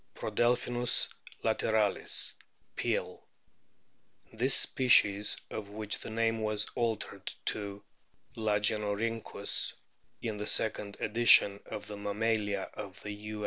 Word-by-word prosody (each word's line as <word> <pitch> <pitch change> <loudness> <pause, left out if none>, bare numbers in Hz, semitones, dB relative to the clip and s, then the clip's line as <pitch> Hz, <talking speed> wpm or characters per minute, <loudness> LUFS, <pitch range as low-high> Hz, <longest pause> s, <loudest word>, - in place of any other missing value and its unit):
Prodelphinus 120 0 0 0.3
lateralis, 110 -2 0 0.4
Peale. - - -2 0.5
* - - -36
This 125 +4 +4
species, 105 -5 +5
of 105 -2 -6
which 105 0 -4
the - - -8
name 115 0 0
was 105 -1 -1
altered 115 -3 -3
to 100 -1 -3 0.5
Lagenorhynchus 105 +1 0 0.5
in 110 -3 -4
the 105 +1 -4
second 105 -2 -1
edition 105 -3 +6
of 105 - -7
the 105 - -8
Mammalia 105 -1 -1
of 100 -2 -9
the 105 - -5
U. 105 +1 -7
105 Hz, 105 wpm, -31 LUFS, 105-115 Hz, 0.5 s, edition